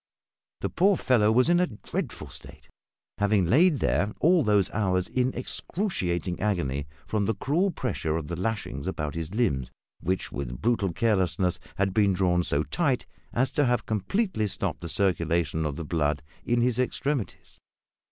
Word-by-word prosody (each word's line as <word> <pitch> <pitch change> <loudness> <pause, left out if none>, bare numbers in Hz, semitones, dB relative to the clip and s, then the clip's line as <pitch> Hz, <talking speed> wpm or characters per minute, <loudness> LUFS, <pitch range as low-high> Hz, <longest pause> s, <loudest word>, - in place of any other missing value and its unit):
The - - -1
poor 195 +1 +3
fellow 110 -4 +3
was 125 +4 +4
in 175 +1 +4
a 180 - +3
dreadful 110 -7 -5
state, - - -11 0.5
having 100 -2 +3
lain 155 - +4
there 100 - 0
all 170 +2 +5
those 105 -4 +2
hours 95 -3 +1
in 130 0 0
excruciating 95 - -2
agony 70 -9 -1 0.2
from 105 -2 0
the 110 - +1
cruel 160 - +1
pressure 125 - -2
of 80 -3 -5
the 85 - -3
lashings 90 - -3
about 75 -5 -3
his 85 +3 -5
limbs, 70 - 0 0.3
which, 95 +2 -2
with - - -5
brutal 110 -5 +1
carelessness, 95 -3 +1 0.2
had 95 -1 0
been 100 -2 +3
drawn 90 -1 +2
so 75 -3 +2
tight 140 - 0 0.3
as 130 +2 +1
to 145 - +2
have 120 -2 +1
completely 110 - 0
stopped - - -3
the 85 - -5
circulation 85 -4 +1
of 70 - -4
the 80 - -5
blood 75 -2 0 0.2
in 120 0 +1
his 125 0 +1
extremities. 130 -1 -2
100 Hz, 160 wpm, -27 LUFS, 85-125 Hz, 0.5 s, all